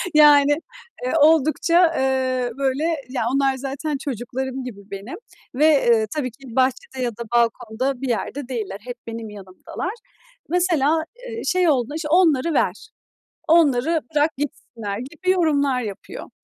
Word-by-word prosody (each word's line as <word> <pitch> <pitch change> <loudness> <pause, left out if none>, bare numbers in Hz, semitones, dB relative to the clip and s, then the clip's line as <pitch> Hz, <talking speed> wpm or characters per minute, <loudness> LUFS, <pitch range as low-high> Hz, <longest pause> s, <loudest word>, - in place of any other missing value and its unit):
Yani, 290 -1 +7 0.5
eee, 255 - -1
oldukça, 320 +3 +4
eee, 260 -2 0
böyle, 275 +2 0 0.3
ya, 255 -3 -2
onlar 270 -1 +2
zaten 280 +2 -3
çocuklarım 265 0 -4
gibi 230 -5 -8
benim 200 +5 -6 0.4
ve, 300 +3 +3
eee, 235 -7 +4
tabii 255 -5 -2
ki 240 0 -13
bahçede 260 0 0
ya 240 - 0
da 235 +2 -7
balkonda 235 +3 0
bir 270 - -2
yerde 250 +3 -3
değiller. 215 -6 -4
Hep 245 -1 -5
benim 225 -1 -6
yanımdalar. 200 - -7 0.6
Mesela, 325 -3 +2 0.3
eee, 455 0 -5
şey 365 -2 +2
olduğunda 275 0 0
işte, 315 -1 -3
"Onları 330 -3 +3
ver, 440 - -1 0.6
onları 315 -1 +3
bırak 300 +2 +3
gitsinler," 225 -7 -5
gibi 320 +8 -5
yorumlar 285 -7 +2
yapıyor. 205 -4 -7
265 Hz, 140 wpm, -22 LUFS, 245-305 Hz, 0.6 s, Yani